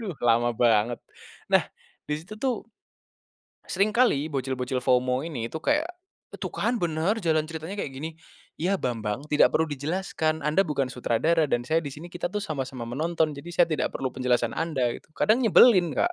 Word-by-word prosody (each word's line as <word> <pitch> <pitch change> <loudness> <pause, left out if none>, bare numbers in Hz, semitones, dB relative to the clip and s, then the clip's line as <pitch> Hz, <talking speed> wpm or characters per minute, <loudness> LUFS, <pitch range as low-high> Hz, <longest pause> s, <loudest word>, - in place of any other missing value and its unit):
Duh, 195 -9 -5
lama 120 0 +3
banget, 115 0 +3 0.6
nah, - - +4 0.4
di 150 - 0
situ 175 +7 -10
tuh 250 -5 -1 1.0
seringkali 200 - +2
bocil-bocil 130 -1 -2
FOMO 125 +1 +2
ini 120 -8 -4
tuh, 160 - -5
kayak, 300 +3 +2 0.5
"Tuh - - -5
kan 240 +1 0
bener 170 +3 0
jalan 155 -2 +2
ceritanya 160 +2 -6
kayak - - -3
gini." 150 +5 -5 0.5
Iya, 190 +4 +1
bambang, 115 -1 -3
tidak 150 - +6
perlu 160 - +2
dijelaskan. 155 +1 -2
Anda 150 +5 +3
bukan 140 -7 -1
sutradara 150 +6 +1
dan 120 -2 0
saya 160 +1 +2
di 145 - -6
sini, 150 +5 -9
kita 175 0 -3
tuh 210 +3 -3
sama-sama 135 -7 -4
menonton 155 +5 0
jadi 150 +5 -9
saya 175 0 +4
tidak 155 - 0
perlu 130 -2 -3
penjelasan 125 -2 0
anda, 135 -8 0
gitu. - - -12
Kadang 215 +5 +3
nyebelin, 205 - +5
Kak. 355 - +2
155 Hz, 170 wpm, -26 LUFS, 130-175 Hz, 1.0 s, tidak